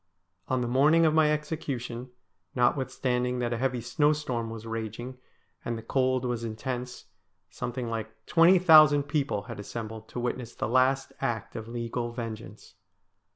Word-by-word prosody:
On 130 -1 0
the 120 - -1
morning 150 +7 +4
of 155 - +3
my 155 -1 +4
execution, 140 -6 -4 0.5
notwith 130 +1 +2
standing 125 -1 -1
that 120 -1 -1
a - - -2
heavy 130 -2 0
snowstorm 145 -3 0
was 115 0 -8
raging, 115 +3 -5 0.4
and 115 -1 -3
the 110 - -8
cold 130 +1 +1
was 120 -2 -2
intense, 125 +2 -5 0.5
something 125 0 -4
like 110 0 -6
twenty 170 +3 +6
thousand 155 -5 +7
people 140 -8 -1
had - - -8
assembled 110 +1 -7
to - - -5
witness 120 -1 -3
the - - -2
last 130 +3 +2
act 115 -2 -2
of 110 -1 -6
legal 120 0 -3
vengeance. 115 -2 -8
125 Hz, 155 wpm, -28 LUFS, 115-135 Hz, 0.5 s, thousand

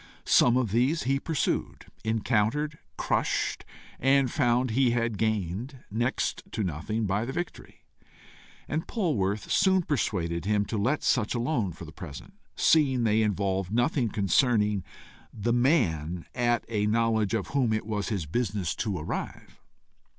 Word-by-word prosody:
Some 120 0 +5
of 120 -6 0
these 130 +9 +2
he 135 +2 +1
pursued, 155 0 -2 0.2
encountered, 115 +7 0 0.2
crushed - - 0 0.4
and 135 -1 +3
found 120 +1 +2
he 130 +2 +3
had 115 -3 -1
gained 110 - -2
next 120 +5 -1
to 110 - -1
nothing 100 +7 -2
by 100 +2 0
the 125 - -4
victory; 175 +3 -6 0.8
and 155 +3 -2
Polwarth 110 - -1
soon 190 -1 +4
persuaded 90 - -1
him 105 0 +1
to 110 - -3
let 130 +9 0
such, 120 -3 +1
alone 120 - 0
for 85 +1 -10
the 80 - -10
present, 70 -3 -9 0.2
seeing 135 -6 +3
they 110 0 +3
involved 95 -3 0
nothing 120 +1 +1
concerning 105 -1 +2 0.5
the 115 +3 -1
man 90 - +1
at 120 -1 +1
a 105 -2 0
knowledge 110 -2 +1
of 100 - -3
whom 130 -5 +1
it 110 -1 -1
was 105 -3 -2
his 100 -7 -2
business 100 0 -1
to 105 -5 -2
arrive. 75 - -6
115 Hz, 145 wpm, -27 LUFS, 100-130 Hz, 0.8 s, Some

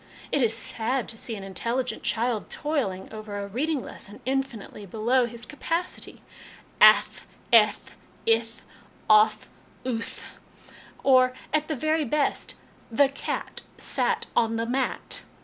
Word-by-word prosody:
It 285 - +2
is 225 -2 +2
sad 235 +2 0
to 230 - -7
see 225 0 -4
an 200 - -7
in 195 0 -8
telligent 245 +6 -2
child 230 -1 -1
toiling 255 -13 -2
over 215 -1 -6
a 200 - -3
reading 290 +10 -1
lesson 210 -5 -8
infinitely 260 -6 -3
below 235 +5 +2
his 235 0 -9
capacity 335 +4 -4 0.6
ath, - - +6 0.3
eth, 215 -2 +4 0.3
ith, 230 0 +1 0.4
oth, 215 0 +5 0.4
uth 230 -3 -3 0.8
or, 255 -1 +5 0.2
at 305 0 +1
the 310 - -1
very 310 +4 +1
best, 290 +2 -1 0.3
'The 270 +4 +4
cat 275 - -5 0.2
sat - - +1
on 225 -1 +2
the 230 0 -1
mat.' 255 +2 -1
235 Hz, 130 wpm, -26 LUFS, 220-270 Hz, 0.8 s, ath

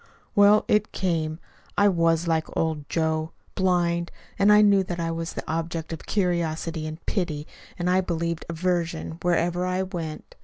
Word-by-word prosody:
"Well, 205 0 +6
it 210 0 +2
came. 160 -4 -1 0.4
I 205 - +5
was 165 -2 +2
like 160 -1 +1
old 155 -3 -1
Joe 160 -1 0 0.2
blind. 175 -2 +1 0.3
And 200 +1 +6
I 210 0 +7
knew 200 -2 +5
that 175 -2 -5
I 165 0 -1
was 165 0 -4
the - - -6
object 165 0 -3
of 160 - -8
curiosity 165 -4 -1
and 155 +2 -8
pity, 155 -7 -2 0.3
and, 175 - -2
I 185 +1 +4
believed, 170 -2 -2
aversion, 170 -1 -2
wherever 175 0 +1
I 185 +1 0
went. 170 -5 -6
170 Hz, 160 wpm, -25 LUFS, 160-185 Hz, 0.4 s, I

